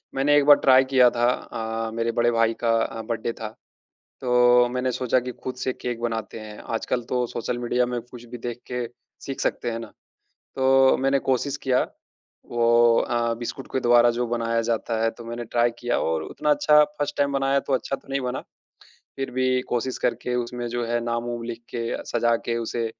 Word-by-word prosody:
मैंने 140 +2 +3
एक 145 - +3
बार 145 0 +9
ट्राई 130 0 +7
किया 125 -2 +6
था 120 0 -2
अ, 115 -2 -3
मेरे 115 0 -1
बड़े 120 +1 +2
भाई 115 -1 +2
का 115 - +1
अ, 115 - -5
बर्थडे 115 +1 -3
था। 110 -2 -6 0.7
तो 125 -1 +5
मैंने 125 0 -1
सोचा 125 0 +1
कि 125 +1 -5
खुद 130 - -4
से 130 0 -2
केक 120 -2 -5
बनाते 115 -1 -3
हैं, 105 -1 -9
आजकल 120 +2 -2
तो 125 -1 +1
सोशल 120 +1 -3
मीडिया 125 +1 +1
में 120 0 -3
कुछ 120 0 -13
भी 120 +1 -8
देख 120 0 -6
के 125 -1 -2 0.4
सीख 135 - -5
सकते 120 - -1
है 115 - -4
ना? 115 - -7 0.7
तो 135 0 +4
मैंने 135 +1 +2
कोशिश 135 +2 0
किया 130 -2 +2 0.7
वो 120 0 +4
अ, 120 -1 0
बिस्कुट 120 +2 -6
के 130 - +2
द्वारा 120 -1 +5
जो 120 0 0
बनाया 115 -1 0
जाता 115 0 -1
है 115 - +3
तो 115 +1 -12
मैंने 120 +1 -5
ट्राई 120 +1 +1
किया 120 - 0
और 80 -1 -1
उतना 150 - -3
अच्छा 150 +1 +5 0.2
फर्स्ट 145 0 -2
टाइम 140 0 +1
बनाया 135 0 +2
तो 140 - -3
अच्छा 130 +1 0
तो - - -21
नहीं 135 0 -1
बना, 125 +1 -3 0.8
फिर 135 -1 -3
भी 130 0 +1
कोशिश 125 +2 -1
करके 120 +1 -1
उसमें 120 0 -3
जो 120 0 -2
है 120 +1 0
नाम-वुम 120 0 -3
लिख 115 0 -6
के 120 - -4 0.2
सज़ा 120 0 +1
के 115 - -1
उसे, 115 0 -2
120 Hz, 200 wpm, -24 LUFS, 115-130 Hz, 0.8 s, बार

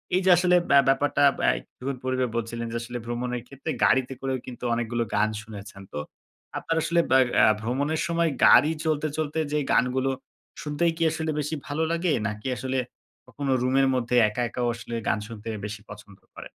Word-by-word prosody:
এই 185 - +3
যে 190 - +4
আসলে 180 0 +4
ব্য 140 - +5
ব্যাপারটা, 135 +1 +2 0.3
আ - - +7
একটু - - -19 0.2
পূর্বে 130 0 0
বলছিলেন 115 0 -3
যে, - - -5
আসলে 120 +1 -6
ভ্রমণের 120 +1 -3
ক্ষেত্রে 140 +3 -5
গাড়িতে 130 0 +2
করেও 135 -1 -1
কিন্তু 125 -2 -10
অনেকগুলো 120 0 -1
গান 105 +1 +3
শুনেছেন। 100 -2 -10
তো 75 - -3 0.6
আপনার 165 - -2
আসলে 170 +1 +2
ব্যা 130 - +7 0.2
আ - - +8 0.2
ভ্রমণের 140 +7 -1
সময় 170 -1 +1 0.2
গাড়ি 150 +5 +7
চলতে, 155 -1 +1
চলতে 155 0 -2
যে 150 - +1 0.2
গানগুলো 130 +2 +2 0.5
শুনতেই 150 +3 0
কি 165 - 0
আসলে 160 0 -3
বেশি 150 +2 -2
ভালো 150 +2 -1
লাগে, 170 +1 0 0.2
নাকি 105 +2 -5
আসলে 130 +4 -2 0.5
কখনো 135 +2 -3
রুমের 135 +2 +3
মধ্যে 125 0 0
একা, 115 +4 -3
একাও 120 0 -2
আসলে 120 0 -7
গান - - +1
শুনতে 115 -2 -10 0.2
বেশি 105 0 -6
পছন্দ 105 -1 -12 0.2
করেন? - - -10
130 Hz, 180 wpm, -26 LUFS, 115-150 Hz, 0.6 s, আ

